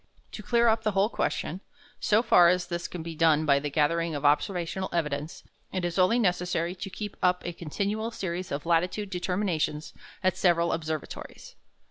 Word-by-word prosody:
To -, -, -7 dB
clear 235 Hz, +2 st, +2 dB
up 220 Hz, 0 st, +3 dB
the 215 Hz, -2 st, 0 dB
whole 195 Hz, +2 st, +3 dB
question, 185 Hz, -5 st, -2 dB, 0.4 s
so 215 Hz, +2 st, +3 dB
far 175 Hz, -7 st, +6 dB
as 180 Hz, 0 st, +1 dB
this 175 Hz, -1 st, -4 dB
can 175 Hz, -3 st, -7 dB
be 165 Hz, 0 st, -6 dB
done 155 Hz, -1 st, +3 dB
by 140 Hz, -2 st, +4 dB
the 145 Hz, +1 st, -3 dB
gathering 160 Hz, +3 st, +1 dB
of 145 Hz, 0 st, -4 dB
observational 175 Hz, +5 st, +1 dB
evidence, 150 Hz, 0 st, -3 dB, 0.3 s
it 185 Hz, -2 st, -2 dB
is 175 Hz, +2 st, -2 dB
only 185 Hz, +6 st, +4 dB
necessary 180 Hz, -4 st, 0 dB
to 195 Hz, +2 st, -7 dB
keep 205 Hz, +1 st, -6 dB
up 180 Hz, 0 st, +2 dB
a 175 Hz, -, -3 dB
continual 200 Hz, +7 st, -3 dB
series 185 Hz, -4 st, -4 dB
of 140 Hz, +3 st, -3 dB
latitude 180 Hz, +4 st, 0 dB
determinations 180 Hz, -5 st, -1 dB, 0.3 s
at 185 Hz, -1 st, +2 dB
several 170 Hz, -2 st, +3 dB
observatories. 155 Hz, -2 st, -6 dB
175 Hz, 175 wpm, -27 LUFS, 160-195 Hz, 0.4 s, far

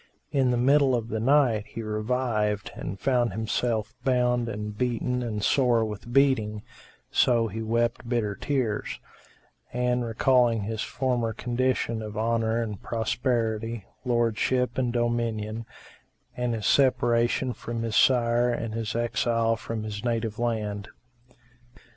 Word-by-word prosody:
In 135 Hz, -3 st, +2 dB
the 125 Hz, -, +2 dB
middle 135 Hz, +1 st, +4 dB
of 115 Hz, -1 st, -3 dB
the 110 Hz, -, -2 dB
night, 120 Hz, -4 st, +3 dB
he 115 Hz, -, -6 dB
revived 110 Hz, -1 st, -1 dB
and 95 Hz, +2 st, -6 dB
found 125 Hz, -2 st, +2 dB
himself 110 Hz, 0 st, -1 dB
bound 125 Hz, -2 st, +2 dB
and 105 Hz, -1 st, -5 dB
beaten 125 Hz, +1 st, -1 dB
and 110 Hz, -4 st, -3 dB
sore 120 Hz, -3 st, +3 dB
with 110 Hz, +2 st, -7 dB
beating: 115 Hz, -6 st, +2 dB, 0.5 s
so 115 Hz, -2 st, +3 dB
he 110 Hz, +3 st, -5 dB
wept 115 Hz, +1 st, -1 dB
bitter 115 Hz, -4 st, 0 dB
tears; 120 Hz, -3 st, -2 dB, 0.7 s
and 125 Hz, 0 st, 0 dB
recalling 120 Hz, -1 st, +2 dB
his 110 Hz, +2 st, -3 dB
former 120 Hz, -4 st, -1 dB
condition 120 Hz, -1 st, -1 dB
of 105 Hz, -1 st, -6 dB
honour 115 Hz, +1 st, +1 dB
and 105 Hz, -4 st, -6 dB
prosperity, 115 Hz, -2 st, -1 dB, 0.2 s
lordship 120 Hz, +1 st, +1 dB
and 125 Hz, -2 st, +1 dB
dominion, 115 Hz, -2 st, -1 dB, 0.7 s
and 125 Hz, -1 st, -1 dB
his 110 Hz, -, -4 dB
separation 120 Hz, -1 st, +3 dB
from 115 Hz, -1 st, -5 dB
his 115 Hz, -2 st, -2 dB
sire 120 Hz, -1 st, +4 dB
and 115 Hz, -2 st, -2 dB
his 115 Hz, -1 st, -3 dB
exile 115 Hz, -1 st, +1 dB
from 110 Hz, 0 st, -5 dB
his 105 Hz, -1 st, -5 dB
native 115 Hz, -2 st, -1 dB
land. 105 Hz, -3 st, -2 dB
115 Hz, 130 wpm, -26 LUFS, 110-125 Hz, 0.7 s, middle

